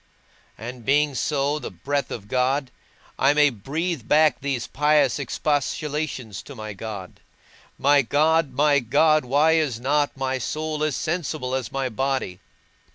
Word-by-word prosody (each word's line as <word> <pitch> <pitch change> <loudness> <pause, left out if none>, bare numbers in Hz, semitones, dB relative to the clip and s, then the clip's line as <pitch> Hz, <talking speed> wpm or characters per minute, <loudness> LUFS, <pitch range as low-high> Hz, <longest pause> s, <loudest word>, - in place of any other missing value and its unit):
And 120 +2 -8
being 145 +3 +2
so, 145 +2 0
the - - -6
breath 140 -1 -3
of 100 -3 -7
God, 130 +2 0 0.5
I 140 +2 +4
may 150 -1 +5
breathe 145 - -4
back 155 -2 +4
these 135 -4 -2
pious 150 +1 +2
expostulations 145 -4 -2
to 140 - -10
my 110 -2 -6
God: 100 -3 -8 0.6
My 145 +1 +4
God, 150 +3 +2
my 145 +2 +3
God, 155 +5 +3
why 145 +5 +3
is 155 -8 +1
not 145 +3 0
my 130 0 -1
soul 155 +4 -3
as 155 -3 0
sensible 155 -6 -3
as 130 -3 -2
my 135 -1 -1
body? 130 -6 -2
140 Hz, 145 wpm, -23 LUFS, 125-150 Hz, 0.6 s, may